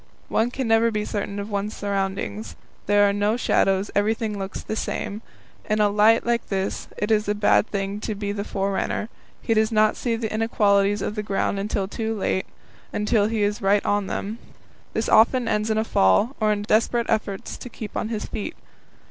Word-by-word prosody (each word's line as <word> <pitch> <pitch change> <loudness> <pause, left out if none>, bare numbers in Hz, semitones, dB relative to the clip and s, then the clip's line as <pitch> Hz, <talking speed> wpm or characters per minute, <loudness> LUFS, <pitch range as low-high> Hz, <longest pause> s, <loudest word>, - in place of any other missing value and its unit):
One 225 +2 +2
can 255 0 -3
never 225 +1 +4
be 210 -1 -2
certain 200 -1 -3
of 205 +1 -5
one's 205 +1 -2
surroundings. 195 - -3 0.3
There 205 0 +5
are 200 - +1
no 205 +3 +1
shadows; 195 -4 +1
everything 215 0 0
looks 190 0 -5
the 220 - -4
same. 215 -1 -3 0.5
In 215 0 +2
a 210 -1 +4
light 215 +2 +4
like 235 0 0
this 195 -1 -2
it 210 +2 -1
is 210 -1 +2
a 205 - +1
bad 205 +1 +3
thing 200 0 -3
to 215 0 -3
be 200 0 -3
the 200 0 -3
forerunner; 200 +2 -2 0.3
he 225 - +1
does 220 +1 +2
not 215 -1 +3
see 235 -2 -1
the 225 -1 -3
inequalities 205 -2 +2
of - - -2
the 210 - -3
ground 200 -1 -1
until 200 -1 -1
too 225 +2 -3
late 190 -1 -1 0.4
until 210 0 +2
he 220 -1 0
is 205 +3 0
right 200 +1 +2
on 205 -1 +1
them. 215 +4 -4 0.5
This 220 - -1
often 235 +2 +4
ends 210 0 0
in 220 - +1
a 220 - +2
fall, 210 - +3
or 215 -1 +2
in 205 -1 -1
desperate 230 +3 +2
efforts 205 -3 -2
to 250 - -9
keep 220 -2 -8
on 215 - -2
his 220 -2 -3
feet. 265 +10 -5
210 Hz, 200 wpm, -24 LUFS, 200-220 Hz, 0.5 s, There